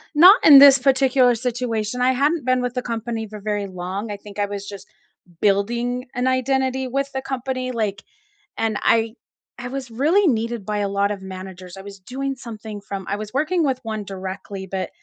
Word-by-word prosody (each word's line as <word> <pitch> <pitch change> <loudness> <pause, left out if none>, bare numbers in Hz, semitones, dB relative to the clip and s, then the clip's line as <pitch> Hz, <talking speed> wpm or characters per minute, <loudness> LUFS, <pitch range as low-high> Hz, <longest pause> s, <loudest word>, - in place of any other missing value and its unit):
not 365 +8 +8
in 285 -3 +11
this 275 -1 +9
particular 260 -2 +3
situation. 240 -1 -2
I 255 +1 +4
hadn't 290 +3 +1
been 255 0 +2
with 250 -1 -2
the 250 - -2
company 230 -1 -4
for 210 0 -9
very 205 -1 -2
long. 190 +3 -5
I 205 - -5
think 205 0 -11
I 205 - +2
was 200 0 -6
just 200 -1 -9 0.5
building 235 +5 0
an 250 +1 0
identity 260 0 0
with 275 +2 -2
the 265 - -3
company 255 -1 -3
like 210 -4 -2 0.6
and 220 -2 0
I 225 0 +2 0.4
I 245 +1 -6
was 265 -1 -5
really 315 - +2
needed 230 -4 -1
by 210 0 -2
a 200 -1 -1
lot 200 0 +1
of 200 -2 -5
managers. 185 -1 -9
I - - -8
was 200 0 -11
doing 270 +7 -4
something 220 -4 -8
from 195 -1 -7
I 200 - 0
was 215 +1 -7
working 310 +5 +1
with 265 -3 0
one 220 -2 -4
directly, 190 0 -7
but, 190 -1 -3
230 Hz, 195 wpm, -22 LUFS, 200-260 Hz, 0.6 s, in